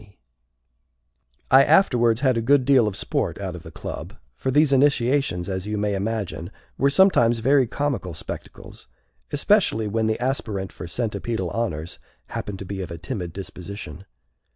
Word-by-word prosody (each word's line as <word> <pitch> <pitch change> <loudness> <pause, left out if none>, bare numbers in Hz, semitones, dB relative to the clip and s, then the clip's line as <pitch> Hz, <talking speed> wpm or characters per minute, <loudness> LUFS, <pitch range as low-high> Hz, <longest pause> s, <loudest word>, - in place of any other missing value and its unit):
C. 105 -2 -20 1.3
I 135 +1 +8
afterwards 125 - +4
had 130 -3 +3
a 115 - 0
good 130 +2 +3
deal 130 -5 +5
of 100 - -3
sport - - -2
out - - -4
of - - -8
the - - -11
club, - - -7 0.2
for 95 - -3
these 145 +1 +4
initiations, 135 -8 +2
as 95 0 -3
you 105 0 -2
may 105 0 0
imagine, 100 -4 -3 0.3
were 140 - +3
sometimes 140 -8 +4
very 130 +2 +3
comical 120 - -2
spectacles, 80 - -9 0.4
especially 110 -1 +2
when 110 +1 0
the 110 - 0
aspirant 110 -7 -2
for - - -8
centipedal 110 -2 -2
honors 90 -8 -3 0.3
happened 100 -2 -5
to 95 - -8
be 95 +1 -5
of 90 - -5
a 85 - -6
timid 85 +1 -5
disposition. 95 -1 -8
110 Hz, 160 wpm, -23 LUFS, 95-130 Hz, 1.3 s, I